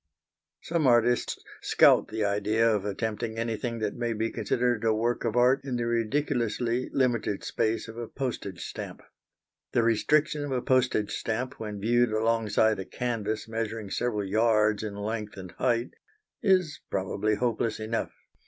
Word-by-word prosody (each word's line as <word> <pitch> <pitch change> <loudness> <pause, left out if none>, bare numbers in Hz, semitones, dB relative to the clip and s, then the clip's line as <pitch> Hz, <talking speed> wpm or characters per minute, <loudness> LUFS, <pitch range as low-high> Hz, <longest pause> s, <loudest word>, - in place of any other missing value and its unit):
Some 165 -4 +1
artists 120 0 +3 0.2
scout - - +5
the 110 -1 -2
idea 105 +3 +2
of 105 -3 +1
attempting 110 +2 -3
anything 115 +1 -2
that 110 -2 -2
may 120 -1 -1
be 115 +1 -1
considered 120 -2 0
a 115 - +3
work 120 +2 0
of 115 - -1
art 125 +2 +4
in 135 -2 -3
the 120 -1 -1
ridiculously 120 0 0
limited 120 -6 0
space 110 +1 -1
of 115 0 -10
a 120 - -4
postage 110 -10 -4
stamp. - - -7 0.7
The 120 - +3
restriction 150 +7 +2
of 145 - -4
a 130 - +1
postage 125 -5 +2
stamp 125 +4 -3
when 105 -2 -5
viewed 120 +2 +2
alongside 110 -1 +2
a 95 - -4
canvas 110 -1 -3
measuring 110 -2 -4
several 110 -4 -1
yards 110 0 +3
in 105 -2 -5
length 105 0 -4
and 95 -2 -8
height 120 -1 0 0.5
is 185 - +2
probably 100 +3 0
hopeless 115 -1 -1
enough. 110 +1 -2
115 Hz, 155 wpm, -28 LUFS, 110-120 Hz, 0.7 s, scout